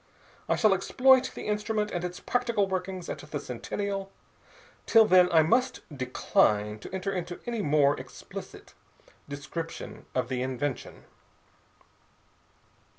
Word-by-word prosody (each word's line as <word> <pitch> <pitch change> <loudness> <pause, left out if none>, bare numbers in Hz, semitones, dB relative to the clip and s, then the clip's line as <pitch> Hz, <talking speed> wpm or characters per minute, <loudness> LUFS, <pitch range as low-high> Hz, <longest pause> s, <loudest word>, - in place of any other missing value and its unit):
I - - +3
shall 215 -3 +4
exploit 255 +7 +4
the - - -7
instrument 210 0 -1
and 175 -1 -3
its 180 0 -4
practical 235 -5 0
workings 185 -1 -4
at - - -5
the 150 0 -5
Centennial. 195 - -4 0.8
Till 225 -1 +7
then 180 -3 +5
I 160 -2 +6
must 250 +10 +1
decline 105 -5 +1
to - - -10
enter 190 +1 -2
into 175 -1 -4
any 235 -2 -2
more 145 -2 +3
explicit - - -10 0.6
description 165 +3 -6
of 130 -2 0
the 125 -1 -2
invention." 130 +1 -4
180 Hz, 125 wpm, -28 LUFS, 145-210 Hz, 0.8 s, Till